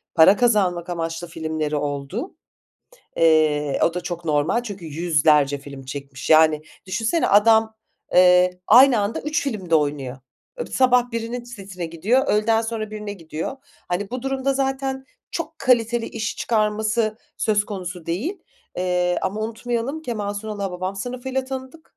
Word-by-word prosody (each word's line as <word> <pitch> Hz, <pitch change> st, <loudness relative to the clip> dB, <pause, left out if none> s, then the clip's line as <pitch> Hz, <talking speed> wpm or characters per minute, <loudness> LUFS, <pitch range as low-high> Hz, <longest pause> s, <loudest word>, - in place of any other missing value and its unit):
para 175 Hz, +5 st, +7 dB
kazanmak 190 Hz, -8 st, +2 dB
amaçlı 165 Hz, 0 st, -3 dB
filmleri 160 Hz, -2 st, -3 dB
oldu. 145 Hz, -, -4 dB, 0.8 s
Eee, 155 Hz, -3 st, +3 dB
o 170 Hz, -, +1 dB
da 180 Hz, -, -2 dB
çok 175 Hz, -1 st, -5 dB
normal 155 Hz, +9 st, +1 dB
çünkü 200 Hz, -6 st, -8 dB
100'lerce 150 Hz, -3 st, +2 dB
film 140 Hz, -1 st, -10 dB
çekmiş. 135 Hz, 0 st, -7 dB
Yani, 155 Hz, -1 st, +5 dB, 0.2 s
düşünsene 225 Hz, -, 0 dB
adam, 220 Hz, +2 st, +5 dB, 0.4 s
eee, 180 Hz, 0 st, +5 dB
aynı 250 Hz, 0 st, +7 dB
anda 205 Hz, +2 st, -2 dB
3 300 Hz, +1 st, -1 dB
filmde 200 Hz, -11 st, -2 dB
oynuyor. 145 Hz, -4 st, 0 dB, 0.5 s
Sabah 250 Hz, -1 st, +3 dB
birinin 230 Hz, +1 st, -4 dB
setine 195 Hz, -7 st, -7 dB
gidiyor, 205 Hz, -, +1 dB
öğleden 225 Hz, +2 st, +2 dB
sonra 225 Hz, -1 st, -4 dB
birine 210 Hz, -1 st, -5 dB
gidiyor. 165 Hz, -, -6 dB, 0.3 s
Hani, 190 Hz, +3 st, -2 dB
bu 250 Hz, 0 st, -4 dB
durumda 270 Hz, 0 st, -1 dB
zaten 265 Hz, 0 st, -2 dB, 0.3 s
çok -, -, -5 dB
kaliteli 240 Hz, -2 st, +2 dB
iş 220 Hz, -1 st, -4 dB
çıkarması 215 Hz, 0 st, 0 dB, 0.2 s
söz 210 Hz, -1 st, +1 dB
konusu 180 Hz, -5 st, -6 dB
değil, 250 Hz, -, -2 dB, 0.4 s
eee, 180 Hz, -1 st, +1 dB
ama 195 Hz, +3 st, -2 dB
unutmayalım 235 Hz, +6 st, -3 dB
Kemal 210 Hz, -7 st, -3 dB
Sunal'ı 210 Hz, 0 st, -5 dB
Hababam 185 Hz, 0 st, -3 dB
Sınıfı'yla 255 Hz, +4 st, -3 dB
tanıdık, 265 Hz, +4 st, -9 dB
205 Hz, 135 wpm, -22 LUFS, 165-235 Hz, 0.8 s, para